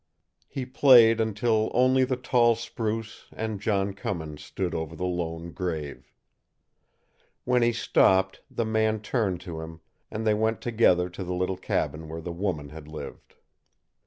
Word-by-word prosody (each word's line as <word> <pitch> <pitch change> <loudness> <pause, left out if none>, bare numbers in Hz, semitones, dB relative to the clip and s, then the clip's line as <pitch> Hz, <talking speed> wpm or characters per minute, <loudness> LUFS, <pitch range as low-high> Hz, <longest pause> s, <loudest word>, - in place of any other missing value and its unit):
He 130 - -5
played 125 -4 +6
until 110 0 +1
only 130 +1 +4
the 130 - -1
tall 120 -2 +3
spruce 110 -1 -4
and 110 -3 -4
John 100 -2 0
Cummins 80 -6 -5
stood 95 -3 -3
over 80 0 -4
the 90 - -3
lone 85 -1 -3
grave. 80 -5 -5 1.3
When 125 0 +3
he 120 0 +4
stopped, 95 -4 +2
the 115 - -2
man 110 -1 +1
turned 105 -6 -1
to 85 -4 -6
him, 80 0 -9 0.3
and 110 +1 -4
they 110 - +4
went 110 +1 0
together 105 -7 +3
to 95 - -6
the 90 0 -3
little 90 +1 -1
cabin 80 -3 -2
where 80 +1 -5
the 85 +1 -6
woman 85 -5 -3
had 75 0 -11
lived. 75 0 -9
100 Hz, 155 wpm, -26 LUFS, 85-115 Hz, 1.3 s, played